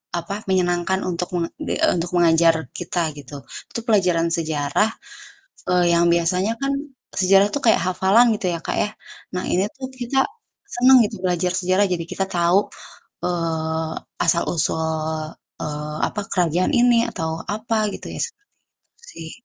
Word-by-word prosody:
apa, 200 +4 -3
menyenangkan 180 0 +1
untuk 180 0 -3
menga 170 -1 -1
di 310 - -2
eee, 180 - +1
mengajar 165 -1 +5 0.2
kita 170 -2 -2
gitu. 140 0 -10 0.3
Itu - - -4
pelajaran 180 -6 +3
sejarah, 155 +4 +1 0.8
eee, 180 -1 +3
yang 170 0 +3
biasanya 180 +5 +1
kan 275 0 0 0.4
sejarah 195 +1 +5
tuh - - 0
kayak 225 - +5
hafalan 200 +6 +4
gitu 185 - -2
ya, 165 - -3
Kak, - - -2
ya. - - +2 0.5
Nah, 180 - -2
ini 190 +3 +1
tuh 265 -1 -6
kita 260 +1 0 0.4
senang 255 -4 +5
gitu 195 - -6
belajar 180 0 +1
sejarah, 185 +2 +2
jadi 170 -2 -2
kita 195 - -1
tahu, 175 +2 +3 0.7
eee, 160 -2 -1 0.3
asal-usul, 160 -2 0 0.3
eee, 150 0 -4
apa, 210 - -4
kerajaan 175 0 +1
ini 240 -1 +4
atau 160 0 -3 0.2
apa 220 +2 -2 0.2
gitu - - -9
ya, - - -7
seperti 415 -3 -5 0.4
itu 465 - -32
sih. 160 -1 -8
180 Hz, 150 wpm, -22 LUFS, 165-205 Hz, 0.8 s, mengajar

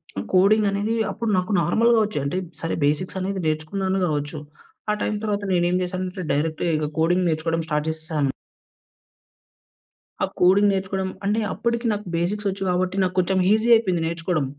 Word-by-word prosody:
హ్మ్, 95 - -4
కోడింగనేది, 205 +2 +3 0.2
అప్పుడు 230 -2 -3
నాకు 185 +3 -1
నార్మల్‌గా 225 +7 +3
వచ్చే, 210 -7 -3
అంటే, 140 +6 -1 0.2
సరే 165 - -2
బేసిక్స్ 165 +6 -1
అనేది 190 +1 -2
నేర్చుకున్నాను 190 +5 -1
గావచ్చు. 145 -1 -2 0.5
ఆ - - +2
టైం 215 - -1
తర్వాత 205 -1 -1
నేనేం 175 0 +2
జేశానంటే, 185 0 -4
డైరెక్ట్‌గా 160 +3 0
ఇక 150 -1 -2
కోడింగ్ 175 +3 +2
నేర్చుకోవడం 165 +1 -1
స్టార్ట్ 150 -1 -1
జేసేసాను... 160 -3 -2 1.9
ఆ - - +4
కోడింగ్ 195 +3 +5
నేర్చుకోడం 190 0 -2 0.2
అంటే 210 +3 +1
అప్పడికి 235 0 -1
నాకు 210 0 -5
బేసిక్స్ 200 +5 -1
ఒచ్చు 195 +1 -4
గాబట్టి, 180 +1 0
నాకు 185 0 -2
కొంచెం 185 +1 +1
ఈజీ 220 +2 +1
అయిపోయింది 185 -7 +1
నేర్చుకోడం... 170 -2 -1
185 Hz, 150 wpm, -23 LUFS, 165-200 Hz, 1.9 s, కోడింగ్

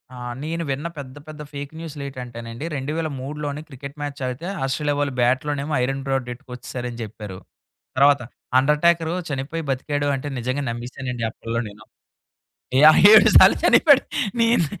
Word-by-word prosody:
ఆ! - - -10 0.3
నేను 165 +2 -3
విన్న 140 +4 -2
పెద్ద 135 -2 -8
పెద్ద 155 -1 -9
ఫేక్ 140 0 -6
న్యూస్‌లేటంటేనండి. 130 -5 -7
2003 145 0 -4
లోని 145 0 -3
క్రికెట్ 140 +1 -10
మ్యాచ్ 145 -1 -5
ఆగితే 125 +6 -5 0.2
ఆస్ట్రేలియా 145 +2 -1
వాళ్ళు 145 -2 -1
బ్యాట్లోనేమో 140 +4 0
ఐరెన్ 135 +2 -2
రోడ్ 135 -2 -1
ఎట్టుకోచ్చేసారని 125 -2 -7
చెప్పారు. 105 -3 -8 0.6
తర్వాత 140 0 +5 0.4
అండర్టాకర్ 160 +4 +2 0.2
చనిపోయి 145 +4 -4
బతికాడు 145 +2 -1
అంటే 135 +2 -5
నిజంగా 130 +4 -2
నమ్మసానండి 120 +1 -5
అప్పడలో 115 +1 -4
నేను. 105 +1 -15 1.0
యాహ్! 155 +1 +8
7 220 - +8
సార్లు - - +7
చనిపోయాడు. 285 -4 +6 0.4
నేను 230 -6 +3
140 Hz, 135 wpm, -22 LUFS, 125-150 Hz, 1.0 s, యాహ్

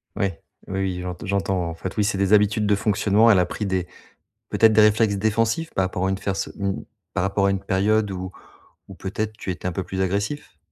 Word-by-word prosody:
Ouais, 100 -5 -2 0.3
oui, 95 0 -3
oui, 90 -2 -2
j'ent 90 -1 -4
j'entends. 95 -3 -1
En 80 - -6
fait, 95 +3 -6
oui, 105 - +3
c'est 100 -1 0
des 100 +1 +2
habitudes 105 0 +4
de 105 0 +3
fonctionnement, 105 +2 +3
elle 100 -4 +6
a 90 - +3
pris 105 +4 -4
des 95 -2 -1 0.6
peut-être 110 -1 +5
des 110 - +5
réflexes 105 -1 +4
défensifs 115 +9 0
par 95 - +2
rapport 95 0 -2
à - - +1
une 95 - -1
ferso 100 0 -2
mmh, 100 -1 -2 0.3
par - - 0
rapport 100 0 +1
à - - +3
une 95 -1 -1
période 105 +2 +2
où 95 0 -5 0.6
où, 95 - -9
peut-être, 105 +4 -4
tu 95 - -5
étais 90 0 -3
un - - -3
peu 95 +1 -3
plus 95 +1 -4
agressif? 100 - -2
100 Hz, 230 wpm, -23 LUFS, 95-105 Hz, 0.6 s, elle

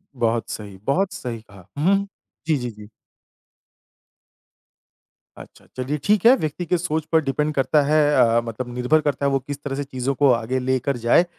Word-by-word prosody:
बहुत 115 -2 0
सही, 100 -3 -7
बहुत 185 - 0
सही 120 - -6
कहा। 100 -4 -17
हुँ, 175 +7 +3
हुँ। 200 0 -4 0.4
जी, 155 -2 +2
जी, 125 -2 -4
जी। 105 -1 -13 2.5
अच्छा, - - -14
चलिए 130 +4 -2
ठीक 210 -1 +2
है, 245 +3 +8
व्यक्ति 160 - -4
के 180 +2 +1
सोच 160 -2 -2
पर 160 -1 +4
डिपेंड 150 +2 -1
करता 145 +2 +2
है 155 +2 +3 0.2
अ, 115 0 +4
मतलब 120 +2 -6
निर्भर 125 +6 +2
करता 140 0 -1
है - - +3
वो 135 - +2
किस 145 +1 -7
तरह 140 -2 -3
से 145 - -2
चीज़ों 135 0 -3
को 140 -2 +6
आगे 120 +2 -1
लेकर 130 +1 -1
जाए 120 +9 +5
135 Hz, 185 wpm, -22 LUFS, 120-155 Hz, 2.5 s, है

